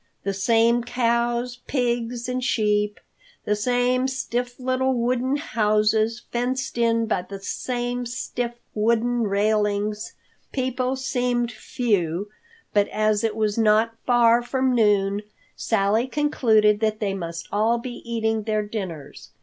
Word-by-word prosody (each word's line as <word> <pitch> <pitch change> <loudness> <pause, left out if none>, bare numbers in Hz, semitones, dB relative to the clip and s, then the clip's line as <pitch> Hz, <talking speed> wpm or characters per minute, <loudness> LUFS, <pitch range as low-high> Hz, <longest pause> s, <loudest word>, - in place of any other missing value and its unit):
The 195 - -1
same 230 +4 +3
cows, 240 0 0
pigs 240 -2 -1
and 255 0 -2
sheep, 210 -3 +1 0.5
the 210 - +1
same 245 +3 +1
stiff 250 -1 -3
little 260 +1 0
wooden 250 +3 0
houses, 220 -3 +1
fenced 250 +1 -2
in 230 -1 +2
by 220 -4 0
the 195 +2 -9
same 245 +4 -3
stiff 245 -1 -3 0.2
wooden 235 +2 +1
railings. 210 +1 0 0.4
People 255 0 -1
seemed 245 -2 -1
few, 205 -6 -1 0.4
but 205 -1 +3
as 215 0 +1
it 220 -2 0
was 215 0 0
not 220 +1 +3
far 240 -1 +5
from 260 +1 0
noon, 205 -3 +2 0.3
Sally 220 +3 +1
concluded 220 -8 +3
that 215 -1 0
they 200 -3 -1
must 170 -3 -5
all 220 +3 +2
be 240 +1 -7
eating 225 -1 -1
their 215 0 -1
dinners. 190 -9 -7
230 Hz, 125 wpm, -24 LUFS, 210-245 Hz, 0.5 s, far